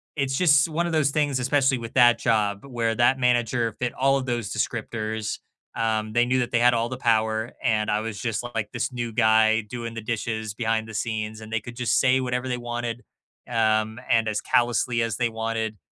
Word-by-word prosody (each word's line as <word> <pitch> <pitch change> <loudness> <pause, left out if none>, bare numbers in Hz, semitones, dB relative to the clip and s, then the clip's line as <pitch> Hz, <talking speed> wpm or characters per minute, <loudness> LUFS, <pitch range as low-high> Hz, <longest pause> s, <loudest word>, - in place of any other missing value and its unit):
it's 135 -2 -1
just 150 -3 +4
one 170 +2 -1
a - - -3
those 155 -3 +2
things, 145 -3 0
especially 135 0 +2
with 115 0 -8
that 120 -2 +6
job, 105 -3 0
where 120 -4 -1
that 120 +3 +3
manager 120 -2 +1
fit 125 - 0
all 135 +1 +3
of 130 - -3
those 120 -4 -2
descriptors. 110 -1 -3 0.4
Um, 110 -1 -1
they 120 +1 +3
knew 130 +1 +1
that 125 - -2
they 120 - +2
had 120 0 +5
all 115 0 0
the 125 - -5
power. 110 -1 +1
And 110 -2 +1
I 105 - +1
was 110 -2 -5
just, 115 -1 -2
like, 105 -2 -2
this 125 +2 -3
new 120 -1 -3
guy 110 0 +4
doing 115 +2 -7
the - - -4
dishes 110 -1 -3
behind 110 -1 -1
the 110 - -9
scenes, 110 0 -3
and 110 0 -10
they 110 - 0
could 120 +3 -10
just 125 -1 +1
say 130 0 +3
whatever 125 0 -2
they 125 - -1
wanted, 120 0 -4 0.5
um, 110 -1 +1
and 115 -1 +3
as 105 -1 -1
callously 120 0 +1
as 115 -3 -1
they 120 -1 +1
wanted, 110 -1 -3
115 Hz, 210 wpm, -24 LUFS, 110-125 Hz, 0.5 s, that